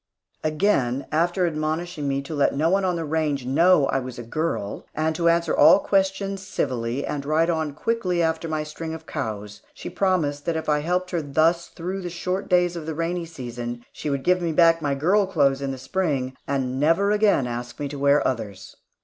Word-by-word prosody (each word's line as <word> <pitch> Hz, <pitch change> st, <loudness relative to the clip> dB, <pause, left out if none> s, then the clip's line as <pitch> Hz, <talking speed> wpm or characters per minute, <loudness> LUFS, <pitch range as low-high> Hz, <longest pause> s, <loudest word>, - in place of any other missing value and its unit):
After 155 Hz, -, +2 dB
again 140 Hz, -8 st, +1 dB
admonishing 165 Hz, -2 st, 0 dB
me 140 Hz, 0 st, -1 dB
to 150 Hz, -, -7 dB
let 145 Hz, -2 st, +2 dB
no 160 Hz, +4 st, +2 dB
one 195 Hz, +1 st, +2 dB
on 180 Hz, -2 st, +1 dB
the 165 Hz, -1 st, -3 dB
range 150 Hz, -4 st, -1 dB
know 155 Hz, +4 st, +4 dB
I 135 Hz, -, 0 dB
was 130 Hz, -1 st, -7 dB
a 120 Hz, -, -6 dB
girl, 115 Hz, -5 st, -3 dB
and 155 Hz, +1 st, 0 dB
to 170 Hz, +1 st, +2 dB
answer 170 Hz, 0 st, +2 dB
all -, -, +7 dB
questions 195 Hz, 0 st, 0 dB
civilly 130 Hz, -, -2 dB
and 145 Hz, -2 st, -3 dB
ride 160 Hz, +4 st, +2 dB
on 160 Hz, -3 st, -2 dB
quickly 185 Hz, -2 st, -1 dB
after 160 Hz, 0 st, 0 dB
my 155 Hz, -1 st, -2 dB
string 160 Hz, +1 st, -6 dB
of 160 Hz, 0 st, -11 dB
cows, 105 Hz, -9 st, -5 dB
she -, -, -7 dB
promised 175 Hz, -6 st, 0 dB
that 165 Hz, -1 st, 0 dB
if 160 Hz, -, -5 dB
I 150 Hz, -1 st, +2 dB
helped 180 Hz, +4 st, -1 dB
her 170 Hz, -2 st, 0 dB
thus 160 Hz, +4 st, +1 dB
through 185 Hz, +3 st, -5 dB
the 175 Hz, -, -4 dB
short 180 Hz, +3 st, -3 dB
days 180 Hz, -1 st, +3 dB
of 160 Hz, -2 st, -6 dB
the 160 Hz, -, -3 dB
rainy 170 Hz, +1 st, -2 dB
season, 120 Hz, -5 st, -6 dB
she 150 Hz, -, -4 dB
would 140 Hz, -1 st, -2 dB
give 180 Hz, 0 st, +3 dB
back 165 Hz, 0 st, +5 dB
my 140 Hz, -2 st, 0 dB
"girl 190 Hz, +8 st, +2 dB
clothes" 140 Hz, -7 st, +2 dB
in 140 Hz, -, -2 dB
the 135 Hz, -, -4 dB
Spring, 135 Hz, -3 st, -2 dB
and 130 Hz, -2 st, -1 dB
never 165 Hz, +7 st, +3 dB
again 210 Hz, -10 st, +3 dB
ask 120 Hz, 0 st, -5 dB
me 145 Hz, -, -2 dB
to 140 Hz, 0 st, -6 dB
wear 140 Hz, +1 st, +3 dB
others. 100 Hz, -6 st, -5 dB
155 Hz, 205 wpm, -24 LUFS, 140-175 Hz, -, all